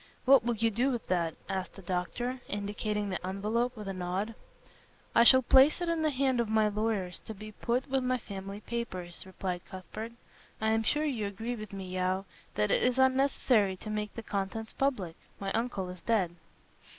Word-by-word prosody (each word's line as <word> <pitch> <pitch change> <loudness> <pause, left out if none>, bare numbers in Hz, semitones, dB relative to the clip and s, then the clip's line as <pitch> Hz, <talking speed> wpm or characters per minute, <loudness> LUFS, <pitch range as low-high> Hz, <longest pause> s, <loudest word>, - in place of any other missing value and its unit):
"What 270 -2 +7
will 240 0 +1
you 225 +1 +2
do 240 +6 +2
with 240 -4 -2
that?" 170 -3 +1
asked 190 -1 -3
the 195 - -11
doctor, 215 +8 -2
indicating 205 0 -2
the 185 - -3
envelope 215 +6 -1
with 210 -2 -6
a 195 - -2
nod. 185 +4 -2 0.8
"I 235 - +7
shall 260 +2 +8
place 265 +6 +6
it 350 -1 -1
in 335 -1 +1
the 310 - +3
hand 265 -2 +1
of 235 -2 +1
my 220 -1 +4
lawyers 210 -4 -1
to 220 - -8
be 215 +2 -9
put 240 +5 -1
with 265 -1 +1 0.2
family 195 0 -7
papers," 185 -7 -4
replied 185 -1 -3
Cuthbert. 215 +5 -7 0.5
"I 220 0 +2
am 225 0 +3
sure 295 +7 +2
you 235 -9 -1
agree 225 +5 -4
with 215 -3 -8
me, 195 -1 -5
Yeo, 185 +1 0 0.3
that 105 0 +2
it - - +3
is 250 0 +2
unnecessary 260 -6 +3
to 215 - -6
make 210 -1 -3
the 230 - -5
contents 210 +2 -3
public. 210 -12 0 0.2
My 195 -1 -2
uncle 225 -5 -1
is 180 -1 -9
dead." 190 -7 +1
215 Hz, 190 wpm, -31 LUFS, 190-240 Hz, 0.8 s, shall